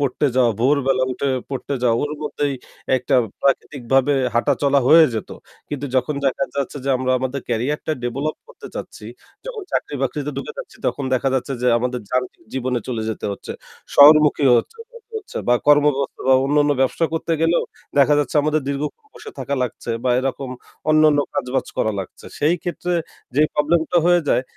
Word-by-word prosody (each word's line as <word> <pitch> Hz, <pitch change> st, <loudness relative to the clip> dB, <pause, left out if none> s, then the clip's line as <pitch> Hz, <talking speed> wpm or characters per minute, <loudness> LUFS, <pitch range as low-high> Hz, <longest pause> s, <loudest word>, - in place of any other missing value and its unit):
পড়তে 140 Hz, +1 st, +1 dB
যাওয়া, 125 Hz, -2 st, +4 dB
ভোরবেলা 135 Hz, 0 st, +2 dB
উঠে 140 Hz, +2 st, -2 dB, 0.2 s
পড়তে 135 Hz, +1 st, -3 dB
যাওয়া, 115 Hz, -2 st, +3 dB
ওর 145 Hz, 0 st, -2 dB
মধ্যেই 145 Hz, -1 st, -2 dB, 0.4 s
একটা 125 Hz, 0 st, -1 dB, 0.3 s
প্রাকৃতিকভাবে 135 Hz, 0 st, +1 dB, 0.2 s
হাঁটাচলা 140 Hz, +4 st, +2 dB
হয়ে 160 Hz, +2 st, +8 dB
যেত। 110 Hz, -, -4 dB, 0.4 s
কিন্তু 145 Hz, -1 st, -4 dB
যখন 150 Hz, +4 st, 0 dB
দেখা 135 Hz, +1 st, +1 dB
যাচ্ছে 140 Hz, 0 st, -3 dB
যে -, -, -2 dB
আমরা 130 Hz, 0 st, -1 dB
আমাদের 130 Hz, +2 st, -3 dB
ক্যারিয়ারটা 125 Hz, +7 st, -1 dB
develop 140 Hz, +6 st, -2 dB
করতে -, -, -12 dB
চাচ্ছি, -, -, -8 dB, 0.4 s
যখন 480 Hz, -4 st, -6 dB
চাকরি -, -, -1 dB
বাকরিতে 145 Hz, +2 st, -2 dB
ঢুকে 135 Hz, -, -5 dB
যাচ্ছি -, -, -8 dB
তখন 140 Hz, -, -1 dB
দেখা 130 Hz, +1 st, +1 dB
যাচ্ছে 130 Hz, +1 st, -1 dB
যে -, -, +1 dB
আমাদের 125 Hz, +1 st, -2 dB
যান্ত্রিক 125 Hz, 0 st, -2 dB
জীবনে 130 Hz, -1 st, -1 dB
চলে 115 Hz, -3 st, -2 dB
যেতে 110 Hz, -, -4 dB
হচ্ছে, 100 Hz, -, -7 dB, 0.4 s
শহরমুখী 150 Hz, 0 st, +7 dB
হচ্ছে 455 Hz, -, -6 dB, 0.7 s
বা 120 Hz, -, +6 dB
কর্মব্যবস্থা 145 Hz, -1 st, +3 dB
বা 130 Hz, -, +7 dB
অন্যান্য 145 Hz, +1 st, +3 dB
ব্যবসা 135 Hz, +5 st, +1 dB
করতে 165 Hz, +1 st, -2 dB
গেলেও 165 Hz, +1 st, +2 dB, 0.4 s
দেখা 140 Hz, +1 st, +5 dB
যাচ্ছে 145 Hz, +1 st, -1 dB
আমাদের 155 Hz, +1 st, +1 dB
দীর্ঘক্ষণ 150 Hz, -, -4 dB
বসে 435 Hz, -, -10 dB
থাকা 140 Hz, -, -2 dB
লাগছে 120 Hz, -1 st, -4 dB
বা 125 Hz, -, +2 dB
এরকম 135 Hz, 0 st, -3 dB, 0.4 s
অন্যান্য 155 Hz, -1 st, +5 dB, 0.2 s
কাজবাজ 125 Hz, +2 st, -1 dB
করা 110 Hz, -, +1 dB
লাগছে। 95 Hz, -, -10 dB
সেই 155 Hz, +4 st, +3 dB
ক্ষেত্রে 180 Hz, 0 st, -3 dB, 0.4 s
যে 145 Hz, -, +4 dB
problem 150 Hz, +3 st, +2 dB
টা 175 Hz, -, +4 dB
হয়ে 175 Hz, 0 st, +5 dB
যায় -, -, +3 dB
140 Hz, 165 wpm, -21 LUFS, 130-150 Hz, 0.7 s, হয়ে